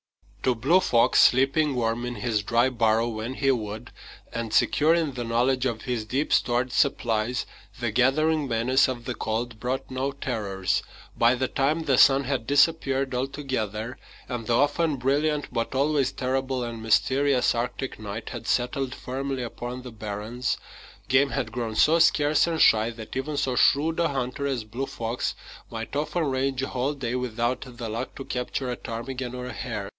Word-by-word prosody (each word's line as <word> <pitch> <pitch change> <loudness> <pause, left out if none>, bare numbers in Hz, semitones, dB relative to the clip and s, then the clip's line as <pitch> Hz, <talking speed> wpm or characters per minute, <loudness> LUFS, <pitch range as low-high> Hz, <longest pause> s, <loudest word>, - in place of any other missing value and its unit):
To 130 -2 +2
Blue 140 +11 +4
Fox, 120 -8 +3
sleeping 135 +3 +4
warm 115 0 0
in 120 0 -4
his 110 -1 -1
dry 120 +4 +2
burrow 115 -2 +2
when 115 +3 -4
he 135 0 +2
would, 110 -3 -4 0.4
and 115 -1 -3
secure 155 +8 +4
in 160 -5 0
the 125 -1 -4
knowledge 125 +3 +1
of 115 -3 -4
his 120 -3 -2
deep 135 +7 -1
stored 120 +1 +2
supplies, 120 -3 +1 0.3
the 120 -2 -1
gathering 145 +5 +2
menace 125 +3 +3
of 120 -2 -5
the 125 - -2
cold 115 0 -3
brought 130 +3 -3
no 130 +2 -1
terrors. 105 -9 -2 0.3
By 120 +2 +4
the 130 +1 -1
time 145 +6 0
the 135 -4 +2
sun 135 0 +6
had 130 -4 -2
disappeared 140 -2 +2
altogether, 125 -4 -3 0.3
and 120 -3 -5
the 120 - +2
often 150 +2 +2
brilliant 145 +2 0
but 115 +2 -2
always 140 0 +2
terrible 130 0 -1
and 115 -1 -5
mysterious 130 +4 +2
Arctic 125 +2 -3
night 105 +1 -6
had 120 -3 -7
settled 130 +1 0
firmly 135 0 -4
upon 120 +1 -6
the 125 - -8
barrens, 110 +3 -3 0.5
game 135 +2 +4
had 130 -5 -2
grown 115 -2 -3
so 160 +8 +4
scarce 155 -2 +4
and 165 -1 -1
shy 110 -4 +5
that 115 0 -9
even 145 +3 -3
so 135 -3 0
shrewd 155 +6 +3
a 170 - +3
hunter 135 0 -2
as 130 -5 -2
Blue 120 +6 -5
Fox 115 +1 -3 0.3
might 115 +3 -6
often 155 +4 -1
range 135 -1 -1
a - - -2
whole 130 +4 -1
day 125 -4 -3
without 125 0 -1 0.2
the 120 -2 -4
luck 115 +4 -4
to 135 - -7
capture 125 +1 -3
a - - -2
ptarmigan 125 +2 -5
or 125 0 -5
a 125 - -6
hare. 105 -6 -5
125 Hz, 175 wpm, -26 LUFS, 115-135 Hz, 0.5 s, sun